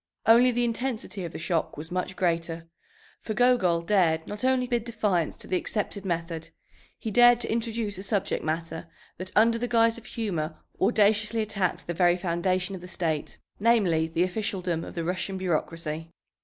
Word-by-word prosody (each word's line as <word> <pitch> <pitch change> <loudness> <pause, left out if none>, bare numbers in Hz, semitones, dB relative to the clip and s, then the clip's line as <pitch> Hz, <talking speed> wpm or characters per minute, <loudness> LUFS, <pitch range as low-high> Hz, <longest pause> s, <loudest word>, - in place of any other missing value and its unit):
Only 235 +3 +7
the 240 0 +1
intensity 230 -4 -3
of 165 - -6
the - - -7
shock 165 0 -1
was 160 +3 -7
much 180 +1 -2
greater. 165 -2 -1 0.5
For 215 - -5
Gogol 195 -10 +3
dared 170 -5 +2
not 210 +2 -7
only 260 -1 +3
bid 240 -2 0
defiance 210 -8 0
to - - -7
the 185 - +1
accepted 200 0 -3
method; 165 -2 -3 0.5
he 220 - -4
dared 240 +2 +7
to - - -2
introduce 225 -3 -2
a - - -4
subject 195 0 -1
matter 165 +1 -3 0.3
that 185 +1 -4
under 230 +2 +4
the 245 - -1
guise 230 -1 +3
of 230 - -19
humor 180 -9 -3 0.2
audaciously 215 +1 +3
attacked 195 -4 -2
the 170 - -3
very 175 0 +3
foundation 185 +2 -1
of 185 - -6
the 180 - -9
state, 165 -4 -2 0.2
namely, 200 -8 +3
the 165 +2 +1
officialdom 185 -3 -2
of - - -9
the 170 - -2
Russian 185 +3 -2
bureaucracy. 165 -2 -2
190 Hz, 175 wpm, -27 LUFS, 170-225 Hz, 0.5 s, Only